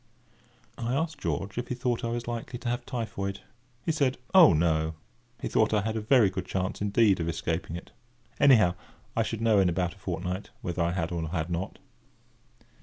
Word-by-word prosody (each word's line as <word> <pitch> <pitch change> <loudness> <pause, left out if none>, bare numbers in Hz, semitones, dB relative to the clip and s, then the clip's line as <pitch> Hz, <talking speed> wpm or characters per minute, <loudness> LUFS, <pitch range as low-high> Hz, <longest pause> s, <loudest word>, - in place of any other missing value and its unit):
I 120 +2 -1
asked 155 0 -2
George 100 -4 -2
if 120 - -4
he 125 - -2
thought 125 0 -1
I 115 - -1
was 120 0 -3
likely 120 +1 -4
to 120 - -4
have 120 0 -3
typhoid. 100 -5 -3 0.4
He - - +2
said: 140 -4 +1 0.2
"Oh, 185 -5 +9
no;" 80 0 +1 0.4
he - - -3
thought 110 0 +2
I 105 - +3
had 110 +2 -2
a 110 - -1
very 110 -3 +4
good 95 -1 -4
chance 95 +1 -2
indeed 105 -1 +3
of 85 0 -1
escaping 80 0 -2
it. 85 - -9 0.5
Anyhow, 110 -10 +6 0.4
I 115 - +2
should 115 0 -2
know 110 -3 +4
in 95 -2 +4
about 90 0 -1
a 100 - -20
fortnight, 90 +1 -4
whether 90 0 -2
I 85 +1 +1
had 85 -2 -2
or 80 -2 -2
had 80 0 -2
not. 85 +3 -3
100 Hz, 195 wpm, -28 LUFS, 90-120 Hz, 0.5 s, Oh